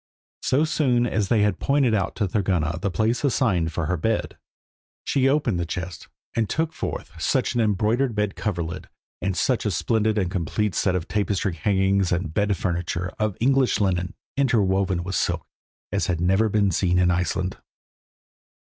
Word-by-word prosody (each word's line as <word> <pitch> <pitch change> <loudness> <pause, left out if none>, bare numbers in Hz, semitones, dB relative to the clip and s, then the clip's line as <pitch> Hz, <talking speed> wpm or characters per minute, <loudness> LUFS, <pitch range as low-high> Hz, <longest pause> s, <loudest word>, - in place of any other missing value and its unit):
So 145 +4 +2
soon 130 -6 +2
as 110 -4 0
they 105 0 +3
had 105 -4 +1
pointed 140 -4 +2
out 100 -4 0
to 105 - 0
Thorgunna 90 -5 0
the 100 - 0
place 110 +7 0
assigned 100 - +1
for 80 0 -2
her 90 +3 0
bed, 110 +7 -1 0.7
she 135 -1 +2
opened 135 -10 +1
the - - 0
chest, 90 +1 -5 0.3
and 115 -3 0
took 160 0 -1
forth - - -5
such 130 - +1
an 120 - +1
embroidered 110 +4 +1
bed 105 -2 -1
coverlid, 85 -5 -3 0.3
and 95 -2 -1
such 130 -3 +1
a 105 - 0
splendid 110 +4 +1
and 95 -4 0
complete 95 +4 -1
set 95 -2 +1
of 90 -2 -2
tapestry 100 -2 0
hangings, 95 +1 +1
and 85 -3 -1
bed 100 0 +1
furniture 90 0 -2
of 110 -3 -1
English 135 +1 +3
linen, 90 -1 0 0.2
interwoven 100 -8 +1
with 95 +2 -5
silk, - - 0 0.5
as - - 0
had 85 -2 0
never 95 +5 +2
been 100 -2 +2
seen 90 +1 +1
in 90 -1 +4
Iceland. 90 +1 -1
100 Hz, 170 wpm, -24 LUFS, 90-115 Hz, 0.7 s, in